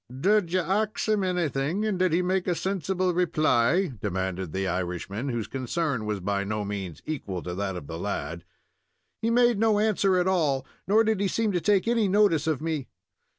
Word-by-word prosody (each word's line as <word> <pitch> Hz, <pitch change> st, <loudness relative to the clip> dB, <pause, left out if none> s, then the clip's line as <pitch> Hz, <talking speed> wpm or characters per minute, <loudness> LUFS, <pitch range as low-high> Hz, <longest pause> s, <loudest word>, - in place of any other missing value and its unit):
"Did 200 Hz, +1 st, +2 dB
ye 185 Hz, -, +2 dB
ax 205 Hz, +5 st, -1 dB
him 215 Hz, -2 st, +2 dB
anything, 175 Hz, 0 st, 0 dB
and 205 Hz, -4 st, -1 dB
did 185 Hz, -1 st, +3 dB
he 175 Hz, +3 st, +2 dB
make 185 Hz, +1 st, 0 dB
a 175 Hz, -, +1 dB
sensible 185 Hz, 0 st, -1 dB
reply?" 165 Hz, -1 st, +2 dB
demanded 95 Hz, -3 st, -2 dB
the 95 Hz, +2 st, -2 dB
Irishman, 95 Hz, +7 st, -3 dB
whose 120 Hz, -4 st, -2 dB
concern 135 Hz, -2 st, -2 dB
was 105 Hz, -2 st, -1 dB
by 100 Hz, +2 st, -1 dB
no 105 Hz, +1 st, -2 dB
means 95 Hz, -6 st, -5 dB
equal 100 Hz, -, -4 dB
to 90 Hz, -, -4 dB
that 95 Hz, 0 st, -3 dB
of 90 Hz, -, -7 dB
the -, -, -6 dB
lad. 85 Hz, +2 st, -4 dB, 0.8 s
"He 225 Hz, -, +1 dB
made 240 Hz, -2 st, +4 dB
no 220 Hz, -1 st, +3 dB
answer 205 Hz, -3 st, +2 dB
at 180 Hz, -, +2 dB
all, 150 Hz, -8 st, +1 dB, 0.2 s
nor 215 Hz, +3 st, +5 dB
did 220 Hz, -2 st, +1 dB
he 200 Hz, -, +1 dB
seem 220 Hz, +2 st, 0 dB
to 175 Hz, -2 st, 0 dB
take 205 Hz, +1 st, +2 dB
any 230 Hz, -3 st, +2 dB
notice 185 Hz, -6 st, +3 dB
of 155 Hz, -3 st, 0 dB
me." 155 Hz, -5 st, -2 dB
165 Hz, 195 wpm, -26 LUFS, -, 0.8 s, nor